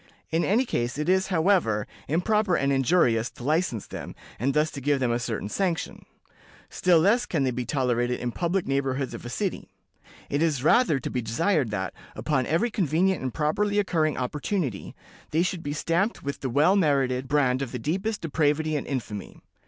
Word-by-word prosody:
_ -, -, -30 dB, 0.3 s
In 165 Hz, +1 st, +1 dB
any 230 Hz, +7 st, +2 dB
case, 120 Hz, -, -2 dB
it 150 Hz, +1 st, -2 dB
is, 190 Hz, +1 st, +3 dB
however, 165 Hz, -, +2 dB, 0.2 s
improper 185 Hz, +4 st, +2 dB
and 140 Hz, -2 st, +1 dB
injurious 125 Hz, -5 st, +2 dB
to -, -, -11 dB
license 150 Hz, -, 0 dB
them, -, -, -8 dB, 0.2 s
and 135 Hz, +5 st, 0 dB
thus 150 Hz, +1 st, +2 dB
to 140 Hz, -, -7 dB
give 145 Hz, +1 st, +1 dB
them 125 Hz, -2 st, +1 dB
a 120 Hz, -, 0 dB
certain 115 Hz, -4 st, -3 dB
sanction; 175 Hz, -, -2 dB, 0.6 s
still 180 Hz, -2 st, +3 dB
less 205 Hz, +9 st, +3 dB
can 155 Hz, -5 st, 0 dB
they 130 Hz, -, +1 dB
be 125 Hz, 0 st, -4 dB
tolerated 125 Hz, -3 st, 0 dB
in 120 Hz, -, -2 dB
public 175 Hz, +6 st, -1 dB
neighborhoods 135 Hz, -1 st, -1 dB
of -, -, -8 dB
a -, -, -5 dB
city. 190 Hz, -, -3 dB, 0.6 s
It 145 Hz, -, -1 dB
is 150 Hz, -6 st, +1 dB
rather 195 Hz, -, +4 dB
to -, -, -5 dB
be 125 Hz, -, -1 dB
desired 135 Hz, -, +1 dB
that, 95 Hz, -3 st, -3 dB, 0.2 s
upon 130 Hz, -5 st, 0 dB
every 210 Hz, +10 st, +1 dB
convenient 185 Hz, 0 st, +1 dB
and 130 Hz, -1 st, -2 dB
properly 200 Hz, -, 0 dB
occurring 160 Hz, -7 st, +1 dB
opportunity, 140 Hz, -, -3 dB, 0.3 s
they 160 Hz, +3 st, +2 dB
should 180 Hz, -1 st, -2 dB
be 145 Hz, -, -4 dB
stamped 170 Hz, +8 st, 0 dB
with 140 Hz, 0 st, -4 dB
the 130 Hz, -, -3 dB
well 150 Hz, +10 st, +4 dB
merited 135 Hz, -7 st, +1 dB
brand 135 Hz, -3 st, +2 dB
of 135 Hz, -4 st, -3 dB
the 125 Hz, -, -3 dB
deepest 190 Hz, -, -2 dB
depravity 155 Hz, 0 st, +1 dB
and 145 Hz, -, -3 dB
infamy. 110 Hz, -7 st, -5 dB
150 Hz, 190 wpm, -26 LUFS, 125-180 Hz, 0.6 s, rather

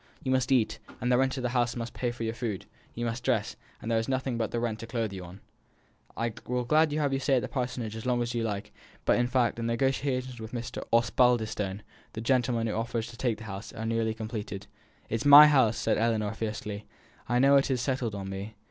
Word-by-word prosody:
You 130 Hz, -, -1 dB
must 130 Hz, 0 st, +1 dB
eat, 125 Hz, -5 st, +2 dB, 0.2 s
and 125 Hz, +1 st, 0 dB
the 125 Hz, -, +5 dB
rent 130 Hz, 0 st, +1 dB
of 130 Hz, -, -3 dB
this 125 Hz, -, 0 dB
house 120 Hz, -1 st, +1 dB
must 120 Hz, -1 st, -5 dB
pay 125 Hz, -, -1 dB
for 120 Hz, -1 st, -5 dB
your 110 Hz, 0 st, -1 dB
food; 115 Hz, -5 st, -4 dB, 0.3 s
you 120 Hz, -, -2 dB
must 115 Hz, +1 st, -3 dB
dress, -, -, 0 dB, 0.2 s
and 115 Hz, -, -4 dB
there 115 Hz, -, +3 dB
is 115 Hz, -, -3 dB
nothing 130 Hz, -1 st, -1 dB
but 115 Hz, -2 st, -1 dB
the 120 Hz, -, -2 dB
rent 115 Hz, -2 st, -2 dB
to 115 Hz, -, -7 dB
clothe 115 Hz, -3 st, -2 dB
you. 90 Hz, -1 st, -8 dB, 0.8 s
I 115 Hz, -1 st, -1 dB
will 125 Hz, 0 st, -1 dB
gladly 155 Hz, +3 st, +3 dB
have 145 Hz, -3 st, +1 dB
you 135 Hz, -, +1 dB
to -, -, -7 dB
stay 135 Hz, -, +3 dB
at 125 Hz, -, +1 dB
the -, -, -2 dB
Parsonage 125 Hz, -4 st, -3 dB
as 115 Hz, +2 st, -6 dB
long 125 Hz, -1 st, +2 dB
as 120 Hz, -, -3 dB
ever 120 Hz, -, -3 dB
you -, -, -1 dB
like; 105 Hz, -2 st, -4 dB, 0.3 s
but, -, -, +4 dB
in 120 Hz, -, +2 dB
fact, 125 Hz, -2 st, +1 dB
the -, -, -4 dB
negotiations 130 Hz, +1 st, -1 dB
with 110 Hz, +1 st, -8 dB
Mr. 120 Hz, -1 st, -4 dB
Osbaldistone, 115 Hz, -4 st, +2 dB, 0.3 s
the 110 Hz, -, -5 dB
gentleman 120 Hz, -1 st, +1 dB
who 110 Hz, -, -1 dB
offers 115 Hz, 0 st, -2 dB
to -, -, -12 dB
take 120 Hz, -2 st, -1 dB
the 115 Hz, -, -10 dB
house, 100 Hz, 0 st, -7 dB
are 110 Hz, -, -5 dB
nearly 115 Hz, -1 st, 0 dB
completed 110 Hz, -3 st, -5 dB, 0.2 s
" -, -, -33 dB
"It 115 Hz, -, +1 dB
is 125 Hz, -, -5 dB
my 145 Hz, +1 st, +11 dB
house!" 130 Hz, -7 st, +4 dB
said -, -, +1 dB
Ellinor, 110 Hz, -2 st, +1 dB
fiercely. 105 Hz, -2 st, -5 dB, 0.4 s
"I 120 Hz, -, +2 dB
know 140 Hz, +2 st, +6 dB
it 140 Hz, -, +2 dB
is 130 Hz, -2 st, +1 dB
settled 125 Hz, -4 st, -1 dB
on 95 Hz, -1 st, -5 dB
me." 100 Hz, +3 st, -6 dB
115 Hz, 245 wpm, -29 LUFS, 110-125 Hz, 0.8 s, my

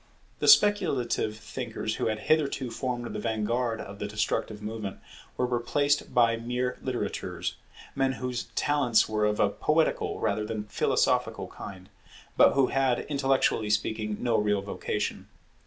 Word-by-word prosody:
The -, -, 0 dB
speculative 155 Hz, -, +4 dB
thinkers 110 Hz, -2 st, -4 dB
who -, -, 0 dB
had 110 Hz, -1 st, -2 dB
hitherto 140 Hz, -5 st, +1 dB
formed 120 Hz, 0 st, -3 dB
the -, -, -3 dB
vanguard 115 Hz, +1 st, -1 dB
of 100 Hz, +1 st, -8 dB
the 105 Hz, -, -3 dB
destructive 105 Hz, 0 st, -2 dB
movement, 105 Hz, -2 st, -5 dB, 0.4 s
were 125 Hz, -, +2 dB
replaced 135 Hz, +4 st, 0 dB
by 115 Hz, -1 st, +4 dB
mere 125 Hz, +2 st, -2 dB
litterateurs, 130 Hz, -2 st, -3 dB, 0.4 s
men 135 Hz, -1 st, +1 dB
whose 125 Hz, +1 st, -3 dB
talents 140 Hz, -6 st, +3 dB
were 105 Hz, -1 st, 0 dB
of 105 Hz, 0 st, 0 dB
a 100 Hz, -, +4 dB
poetical 155 Hz, +8 st, +1 dB
rather 110 Hz, -, 0 dB
than 105 Hz, 0 st, -3 dB
philosophical 105 Hz, -, 0 dB
kind, 95 Hz, -1 st, -9 dB, 0.5 s
but -, -, +6 dB
who 135 Hz, -2 st, +3 dB
had, 135 Hz, -2 st, +2 dB
intellectually 135 Hz, -6 st, +1 dB
speaking, 105 Hz, 0 st, -1 dB
no 120 Hz, -2 st, +1 dB
real 105 Hz, -1 st, +1 dB
vocation. 100 Hz, -, -3 dB
120 Hz, 140 wpm, -28 LUFS, 105-130 Hz, 0.5 s, but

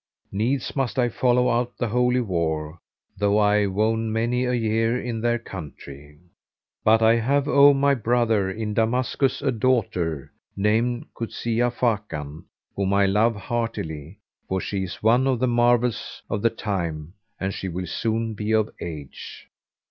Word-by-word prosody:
Needs 120 Hz, +7 st, -1 dB
must 135 Hz, -2 st, -1 dB
I 120 Hz, -1 st, +2 dB
follow 125 Hz, +1 st, +2 dB
out 120 Hz, +1 st, -1 dB
the 120 Hz, -, -1 dB
Holy 125 Hz, +2 st, +2 dB
War, 80 Hz, -5 st, -2 dB, 0.4 s
though 105 Hz, 0 st, +2 dB
I 105 Hz, -1 st, +3 dB
wone 110 Hz, +3 st, 0 dB
many 120 Hz, +3 st, 0 dB
a 125 Hz, -, 0 dB
year 115 Hz, +1 st, +1 dB
in 115 Hz, -3 st, -4 dB
their 120 Hz, 0 st, +1 dB
country. 75 Hz, -, -10 dB, 0.7 s
But 110 Hz, +1 st, +4 dB
I 115 Hz, +1 st, +5 dB
have, 140 Hz, +5 st, +1 dB
O 140 Hz, 0 st, +7 dB
my 140 Hz, +1 st, +3 dB
brother, 115 Hz, -5 st, +1 dB
in 105 Hz, +2 st, -4 dB
Damascus 125 Hz, +5 st, 0 dB
a 135 Hz, -, +2 dB
daughter, 100 Hz, -, 0 dB, 0.3 s
named 115 Hz, +4 st, +1 dB
Kuzia 120 Hz, +1 st, -1 dB
Fakan, 90 Hz, -, -3 dB, 0.3 s
whom 100 Hz, 0 st, 0 dB
I 100 Hz, 0 st, +4 dB
love 105 Hz, +4 st, +2 dB
heartily 100 Hz, -, -4 dB, 0.3 s
for 95 Hz, -, 0 dB
she 100 Hz, +1 st, -3 dB
is 90 Hz, -, -9 dB
one 120 Hz, +4 st, +4 dB
of 130 Hz, -2 st, +2 dB
the 130 Hz, -, +1 dB
marvels 120 Hz, 0 st, +1 dB
of 100 Hz, -, -1 dB
the 115 Hz, -, +4 dB
time 85 Hz, -8 st, -4 dB, 0.3 s
and 95 Hz, +1 st, -2 dB
she 95 Hz, -, -5 dB
will 90 Hz, +1 st, -4 dB
soon 115 Hz, +4 st, -2 dB
be 105 Hz, +1 st, -2 dB
of 110 Hz, -1 st, +2 dB
age.' 75 Hz, -5 st, -8 dB
110 Hz, 155 wpm, -24 LUFS, 95-120 Hz, 0.7 s, O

